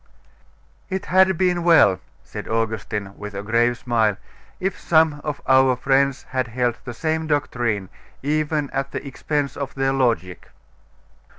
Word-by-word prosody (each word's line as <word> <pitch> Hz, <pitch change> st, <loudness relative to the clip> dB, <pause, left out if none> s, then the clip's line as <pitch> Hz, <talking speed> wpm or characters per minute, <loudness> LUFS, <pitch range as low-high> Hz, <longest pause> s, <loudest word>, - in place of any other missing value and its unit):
'It 190 Hz, 0 st, -3 dB
had 190 Hz, 0 st, +4 dB
been 180 Hz, -1 st, +1 dB
well,' 155 Hz, -, +5 dB, 0.2 s
said -, -, -8 dB
Augustine, 110 Hz, -3 st, -2 dB
with 105 Hz, -1 st, -7 dB
a 100 Hz, -, -4 dB
grave 120 Hz, +3 st, +2 dB
smile, 115 Hz, -5 st, +1 dB, 0.4 s
'if 190 Hz, 0 st, -2 dB
some 160 Hz, -2 st, +3 dB
of 150 Hz, -2 st, -4 dB
our 130 Hz, -1 st, +5 dB
friends 135 Hz, +1 st, +1 dB
had 130 Hz, -2 st, -1 dB
held 120 Hz, 0 st, 0 dB
the 120 Hz, -, -5 dB
same 160 Hz, +3 st, -1 dB
doctrine, 120 Hz, -9 st, -1 dB, 0.4 s
even 150 Hz, 0 st, 0 dB
at 135 Hz, 0 st, -2 dB
the 140 Hz, -, -6 dB
expense 145 Hz, 0 st, -2 dB
of 140 Hz, -1 st, -5 dB
their 135 Hz, 0 st, +1 dB
logic. 115 Hz, -10 st, -1 dB
135 Hz, 140 wpm, -22 LUFS, 115-150 Hz, 0.4 s, well